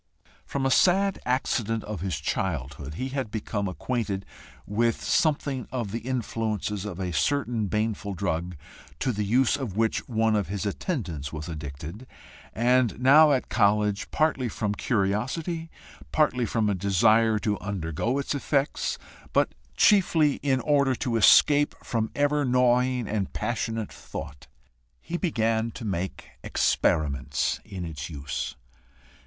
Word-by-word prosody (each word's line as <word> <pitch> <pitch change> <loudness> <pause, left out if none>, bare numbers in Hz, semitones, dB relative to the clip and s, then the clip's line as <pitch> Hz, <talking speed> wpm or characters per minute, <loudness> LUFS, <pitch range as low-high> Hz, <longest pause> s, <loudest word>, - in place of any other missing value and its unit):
From 135 -1 -2
a 135 - +2
sad 195 +5 +3
accident 115 -3 0
of 105 -5 -5
his 90 -5 -2
childhood, 75 -4 -3
he 130 +8 -3
had 135 -4 -3
become 105 -2 -3
acquainted 100 0 -3 0.4
with 115 +3 0
something 140 -5 +1
of 120 -6 -3
the 115 - -2
influences 110 -4 -2
of 95 -3 -6
a 90 -2 -3
certain 120 - 0
baneful 105 -1 -2
drug, 85 +1 -2 0.4
to 130 - 0
the 105 -2 -2
use 120 +6 +3
of 125 -9 -5
which 115 +3 0
one 110 -2 +2
of 105 -2 0
his 100 +2 -3
attendants 95 - -3
was 75 -1 -6
addicted, 80 - -7 0.4
and 120 -2 +2
now 145 +4 +7
at 130 -2 +1
college, 105 -1 +2
partly 150 -6 +1
from 105 -1 -2
curiosity, 130 - -1 0.4
partly 125 -6 +2
from 110 -2 0
a 105 - +2
desire 110 +4 +3
to 105 -1 -1
undergo 100 - -2
its 140 - -1
effects, 140 0 0 0.4
but - - +2 0.2
chiefly 165 -8 +4
in 130 -2 +1
order 140 -2 +2
to 120 -1 -2
escape 145 +6 +5
from 110 -2 -1
ever 145 +1 +2
gnawing 125 -1 +2
and 105 -3 -2
passionate 115 -1 -2
thought, 70 0 -8 0.5
he 170 - -6
began 115 - 0
to 115 - -8
make 95 -2 -3 0.2
EXPERIMENTS 70 -2 +1
in 95 -3 -6
its 80 -2 -6
use. 70 -4 -4
110 Hz, 135 wpm, -26 LUFS, 95-130 Hz, 0.5 s, now